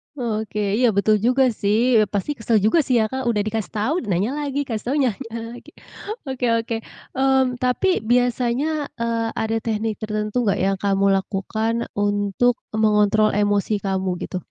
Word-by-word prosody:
Oke 220 -4 -3 0.2
iya 250 - +4
betul 215 +2 +3
juga 255 +5 +3
sih, 220 +3 +2
eee, 215 - +3
pasti 205 +8 -1
kesel 225 0 +1
juga 220 +11 +4
sih 255 - +1
ya - - +2
Kak 265 -1 -3
udah 210 -3 +1
dikasih 215 -3 -3
tahu 215 +8 0
nanya 195 +6 0
lagi, 285 -1 -2
kasih 225 -6 -4
tahu 275 - 0
nanya 260 -6 +2 0.4
lagi, 275 +6 -12 0.6
oke 265 -2 -2 0.2
oke, 225 0 -4 0.4
mmm, 265 -2 +2
tapi 255 +9 +1 0.2
biasanya, 250 +5 +1
eee, 230 -1 0
ada 220 0 -1
teknik 220 0 -1
tertentu 215 +1 -3
nggak 200 - +2
yang 195 0 +1
kamu 195 0 +2 0.2
lakukan 220 +4 -2 0.2
untuk 205 +3 +1 0.2
mengontrol 215 0 +3
emosi 205 0 +1
kamu 190 -1 -1
gitu? 185 - -4
220 Hz, 160 wpm, -22 LUFS, 205-250 Hz, 0.6 s, iya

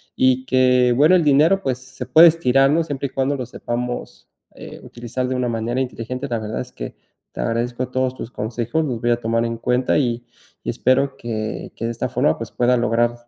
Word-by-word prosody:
Y 130 0 +2
que 125 -1 +4
bueno, 155 +5 +5
el 175 - +3
dinero, 155 +7 +4
pues, 130 -7 -1
se 130 0 -9
puede 160 +7 +8
estirar, 135 -4 +3
¿no? 165 +2 +2
Siempre 145 -3 -4
y - - -13
cuando 135 +2 0
lo 130 - -4
sepamos, 120 0 -5 0.3
eh, - - -10
utilizar 120 +2 -5
de 130 - -2
una 125 -1 -1
manera 115 +2 -2
inteligente. 125 +1 -4
La 120 -2 -1
verdad 110 0 -4
es - - -9
que - - -8 0.4
te - - -11
agradezco 120 - -2
todos 130 0 -1
tus 120 - -8
consejos, 120 +8 -2
los 120 -5 -3
voy 120 0 +1
a 120 - +2
tomar 115 0 0
en 115 0 -3
cuenta, 125 +2 +1
y 120 -2 -1 0.4
y - - -4
espero 135 +2 +1
que 110 -2 -5
que 115 - -4
de 115 - -1
esta 115 - -3
forma, - - +1
pues, - - -6
pueda 125 +1 +2
lograr 120 0 +1
125 Hz, 210 wpm, -21 LUFS, 120-130 Hz, 0.4 s, puede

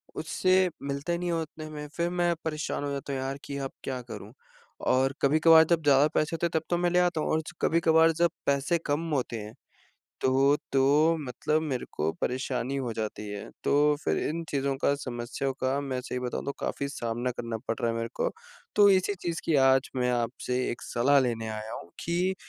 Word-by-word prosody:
उससे 185 0 +2
मिलता 140 +4 -3
ही 170 - +1
नहीं 180 - -2
है 170 - +1
उतने 155 0 -8
में। 150 -1 -7
फ़िर 170 0 +1
मैं 175 -1 +1
परेशान 155 -2 -2
हो 145 - -2
जाता 140 0 -4
हूँ, 130 - -2
यार 135 +1 -3
कि 140 - -5
अब 135 -1 -4
क्या 130 -2 -3
करूँ? 120 -1 -9 0.5
और 130 +1 +2
कभी-कभार 160 +3 +7
जब 165 0 +1
ज़्यादा 145 0 +5
पैसे 155 +2 +1
होते 170 - -1
हैं - - -10
तब - - -27
तो 175 - +2
मैं 175 0 +2
ले 180 - +4
आता 175 -3 +2
हूँ - - -1
और 160 - +2
च 175 - -7
कभी-कभार 165 0 +4
जब 170 +1 +2
पैसे 140 +4 +2
कम 155 +3 -1
होते 125 -3 -1
हैं, 105 +1 -8 0.7
तो 135 +2 +4 0.2
तो 145 +5 +4
मतलब 150 +4 -1
मेरे 135 -6 -2
को 80 +1 0
परेशानी 130 +1 -1
हो 125 -4 -2
जाती 105 -1 -4
है। 105 0 -6 0.2
तो 150 +1 +4
फ़िर - - +1
इन 165 +2 -3
चीज़ों 140 -1 0
का 140 - +3
समस्याओं 130 0 -3
का 130 +2 +1
मैं 135 -2 -3
सही 125 - -4
बताऊँ 125 -1 -3
तो 140 - -1
काफ़ी 140 - -2
सामना 120 -1 -2
करना 115 -1 -4
पड़ - - +1
रहा 115 - +1
है 115 - -3
मेरे 115 0 -2
को। - - 0 0.5
तो 205 -1 +7
इसी 190 +1 +3
चीज़ 170 -3 -4
की 165 - +1
आज 135 0 +4
मैं 125 -1 +1
आपसे 120 +1 -2
1 120 - -6
सलाह 135 +4 +3
लेने 115 -3 -1
आया 110 0 -5
हूँ 85 - -8
कि 180 +3 0
140 Hz, 215 wpm, -28 LUFS, 125-160 Hz, 0.7 s, कभी-कभार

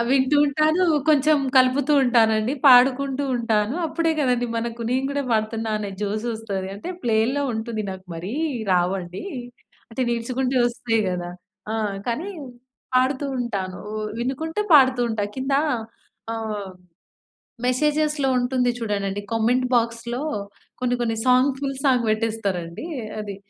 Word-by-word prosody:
వింటూ 270 +2 +3
ఉంటాను. 310 +5 +2 0.2
కొంచెం 300 0 +5 0.2
కలుపుతూ 260 +3 +4
ఉంటానండి. 225 -2 +3
పాడుకుంటూ 265 +2 +5
ఉంటాను. 225 0 0
అప్పుడే 330 +1 0
కదండీ! 250 -3 +1
మనకు 235 0 -4
నేను 260 +2 +1
కూడా 285 0 -1
పాడుతున్నా 220 0 -1
అనే 205 -1 -4
జోస్ 210 +3 -2
వస్తది. 205 -4 -4
అంటే 205 - -7
ప్లేల్లో 235 +5 +1
ఉంటుంది. 220 0 -3
నాకు 190 0 -8
మరీ 175 +6 -6 0.4
రావండి. 180 - -1 0.7
అంటే 255 +3 -2
నిల్చుకుంటూ 255 +3 -1
వస్తాయి 235 -1 0
గదా! 175 -1 -3 0.4
ఆ! - - -1 0.3
కానీ, 275 +11 -2 0.7
పాడుతూ 260 +2 +2
ఉంటాను. 200 -7 -3
ఉ - - -5 0.2
వినుకుంటే 295 - -2
పాడుతూ 260 -3 +6
ఉంటా. 220 -2 -2
కింద 265 +1 -1 0.8
ఆహ్, 215 -3 -4 0.9
మెసేజెస్‌లో 300 +2 +1
ఉంటుంది 250 0 +1
చూడండండి 205 -3 -2
కమెంట్ 240 +3 +2
బాక్స్‌లో 235 +1 0 0.6
కొన్ని 250 -1 +1
కొన్ని 225 -2 0
సాంగ్ 255 +2 +4
ఫుల్ 275 -1 -3
సాంగ్ 255 -3 +3
పెట్టేస్తారండి 215 - -2 0.3
అది. 205 -2 -6
240 Hz, 125 wpm, -23 LUFS, 220-265 Hz, 0.9 s, పాడుతూ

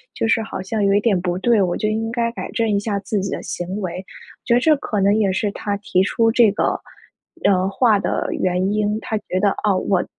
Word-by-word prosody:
就 225 - -1
是 225 - +2
好 220 - -6
像 210 +2 -2
有 200 0 +3
一 - - +4
点 205 -4 +1
不 180 0 -2
对， 225 +1 +3
我 175 -2 0
就 215 - -1
应 225 +1 -2
该 235 -1 -1
改 - - -6
正 230 -1 0
一 205 -1 +1
下 205 -1 -2
自 205 +1 -2
己 195 0 -3
的 - - -3
行 185 +4 -4
为， 180 -1 -4
我 185 - -15
觉 235 - +2
得 - - +4
这 310 +3 +4
可 210 -6 -3
能 200 +2 +3
也 205 -3 +2
是 200 +2 -1
他 205 -1 -3
提 190 -2 +1
出 225 +2 +2
这 230 -4 +5
个， 210 - 0 0.7
呃 190 -1 +3
话 210 0 +3
的 - - -1
原 185 +2 0
因。 210 0 0
他 220 - -2
觉 185 -3 -3
得， 205 - +4
哦， 200 -3 +2
我 185 -3 +2
205 Hz, 265 characters per minute, -20 LUFS, 190-225 Hz, 0.7 s, 这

